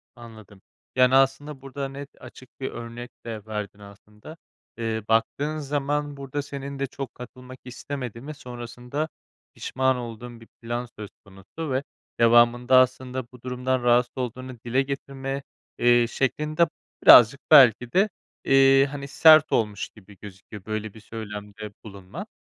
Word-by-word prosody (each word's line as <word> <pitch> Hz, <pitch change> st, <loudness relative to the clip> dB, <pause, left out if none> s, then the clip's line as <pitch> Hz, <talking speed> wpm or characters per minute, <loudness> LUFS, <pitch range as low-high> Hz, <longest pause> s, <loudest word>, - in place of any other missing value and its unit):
Anladım. 110 Hz, -5 st, -14 dB, 0.3 s
Yani, 130 Hz, 0 st, +4 dB
aslında 135 Hz, +1 st, +1 dB
burada 135 Hz, 0 st, -5 dB
net, 140 Hz, +1 st, -9 dB
açık 130 Hz, -, -13 dB
bir 135 Hz, -, -4 dB
örnek 120 Hz, +1 st, -8 dB
de 110 Hz, -3 st, -6 dB
verdin 105 Hz, -2 st, -6 dB
aslında. 105 Hz, +8 st, -14 dB, 0.4 s
Eee, 110 Hz, -2 st, -3 dB
baktığın 140 Hz, +7 st, 0 dB
zaman 145 Hz, 0 st, -2 dB
burada 140 Hz, +1 st, -4 dB
senin 140 Hz, -1 st, -7 dB
de 140 Hz, -, -1 dB
çok 135 Hz, 0 st, -8 dB
katılmak 125 Hz, +1 st, -11 dB
istemediğin 125 Hz, -1 st, -7 dB
ve 155 Hz, -, -5 dB
sonrasında 125 Hz, +3 st, -6 dB, 0.4 s
pişman 130 Hz, 0 st, 0 dB
olduğun 120 Hz, 0 st, -8 dB
bir 115 Hz, -, -15 dB
plan 120 Hz, +1 st, -3 dB
söz 105 Hz, -2 st, -7 dB, 0.2 s
konusu 100 Hz, +11 st, -8 dB
ve 130 Hz, +1 st, 0 dB, 0.4 s
devamında 120 Hz, +2 st, +5 dB
aslında 130 Hz, 0 st, +1 dB
bu 125 Hz, -, -16 dB
durumdan 125 Hz, 0 st, -2 dB
rahatsız 120 Hz, 0 st, +3 dB
olduğunu 130 Hz, 0 st, -5 dB
dile 125 Hz, +3 st, +2 dB
getirme, 135 Hz, 0 st, -5 dB, 0.3 s
eee, 120 Hz, 0 st, +4 dB
şeklin 150 Hz, +5 st, -2 dB
de 170 Hz, -1 st, +5 dB, 0.4 s
birazcık 125 Hz, +3 st, +8 dB
belki 125 Hz, -2 st, +7 dB
de, 195 Hz, +3 st, +3 dB, 0.4 s
eee, 135 Hz, 0 st, +5 dB
hani, 140 Hz, -1 st, -6 dB
sert 155 Hz, +2 st, +6 dB
olmuş 105 Hz, -2 st, -1 dB
gibi 100 Hz, -2 st, -18 dB
gözüküyor, 100 Hz, 0 st, -11 dB
böyle 110 Hz, -1 st, -4 dB
bir 110 Hz, -, -13 dB
söylemde 105 Hz, -1 st, -8 dB
bulunman. 105 Hz, -, -9 dB
125 Hz, 140 wpm, -25 LUFS, 115-135 Hz, 0.4 s, birazcık